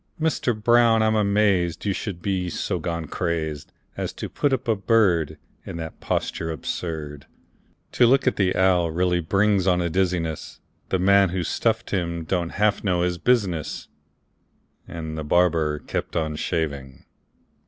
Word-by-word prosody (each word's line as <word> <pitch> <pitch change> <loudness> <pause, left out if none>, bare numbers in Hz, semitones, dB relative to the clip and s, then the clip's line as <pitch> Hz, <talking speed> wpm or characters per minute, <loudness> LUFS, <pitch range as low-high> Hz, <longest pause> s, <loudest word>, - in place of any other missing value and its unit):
Mister 155 -7 0
Brown, 115 0 +4
I'm 110 0 +2
amazed 100 -5 +1
You 100 - +1
should 95 -4 -5
be 95 -3 -1
so - - -2
gone 85 -1 -3
crazed 80 -3 -3 0.2
As - - -3
to - - -6
put 145 - 0
up 130 -2 -1
a 115 - +3
bird 95 -6 +2 0.3
In - - -7
that 80 -1 -7
posture 80 - -2
absurd! 75 -1 -5 0.6
To 120 - +4
look 135 +3 +3
at 130 - +2
that 95 -2 +1
owl 90 -2 +3
really 90 +2 +1
brings 95 +3 +2
on 90 -1 +3
a 85 -1 -1
dizziness; 85 -3 -2 0.3
The 95 - +1
man 100 +1 +4
who 90 0 -2
stuffed - - -1
him 85 -3 -2
don't 85 0 -2
half 105 0 +1
know 90 -3 +1
his 90 -1 -1
business!" 100 -11 0 1.0
And 80 -1 -6
the - - -4
barber 80 -2 +2
kept - - -5
on 80 -1 -1
shaving. 70 -6 -3
90 Hz, 155 wpm, -24 LUFS, 80-100 Hz, 1.0 s, Brown